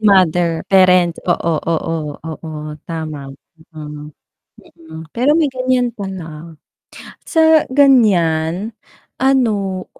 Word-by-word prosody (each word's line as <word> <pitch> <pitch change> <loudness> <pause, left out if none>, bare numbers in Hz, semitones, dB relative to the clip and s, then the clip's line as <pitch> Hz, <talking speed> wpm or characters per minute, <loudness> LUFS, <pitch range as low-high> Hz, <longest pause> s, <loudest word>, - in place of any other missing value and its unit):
Mother, 175 -5 +2
parent, 180 -3 +4
oo, 170 -1 +1
oo, 160 -2 -3
oo, 160 0 -7 0.4
tama, 155 -4 -5 0.5
mm, 150 -1 -8 0.7
mm. 160 -1 -12 0.2
Pero 255 +5 +3
may 315 -1 +2
ganyan 255 -1 0
pala, 170 -5 -8 0.7
sa 320 -1 +4
ganyan 205 - +2 0.5
ano 215 -8 +1
180 Hz, 90 wpm, -17 LUFS, 160-245 Hz, 0.7 s, parent